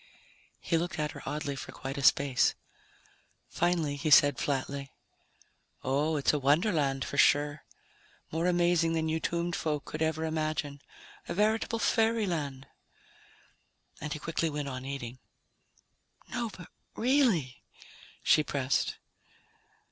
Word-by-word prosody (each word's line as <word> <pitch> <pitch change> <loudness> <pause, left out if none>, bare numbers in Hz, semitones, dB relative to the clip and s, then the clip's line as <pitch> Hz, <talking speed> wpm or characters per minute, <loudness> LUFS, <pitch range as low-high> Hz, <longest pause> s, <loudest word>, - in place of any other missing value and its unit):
He 165 - 0
looked 175 +2 -3
at 150 -1 -1
her - - -10
oddly 145 -1 -3
for 130 - -7
quite 135 +1 -6
a 140 - -3
space. 135 -1 +4 0.9
Finally, 165 -4 0
he 155 +2 -1
said 145 -2 +6
flatly, 140 -1 -2 0.9
"Oh, 145 +4 +1
it's 140 - +2
a 150 - +1
wonderland 145 -2 +2
for 140 - -3
sure, 145 0 +3 0.7
more 165 +2 0
amazing 175 -2 +2
than 160 -1 0
you 160 +1 0
tombed 170 +1 -1
folk 150 -2 -2
could 155 - -6
ever 160 0 0
imagine. 155 -3 -2 0.5
A - - -2
veritable 220 +3 +1
fairyland." 185 - 0 1.4
And 150 - -4
he 155 - -2
quickly 165 +1 -1
went 145 -1 -4
on 130 -1 -6
eating. 130 -3 -6 1.1
"No, 235 -1 -2
but 180 -4 -12 0.3
really," 225 - +2 0.6
she 155 - +5
pressed. 135 -4 -1
155 Hz, 125 wpm, -30 LUFS, 140-170 Hz, 1.4 s, said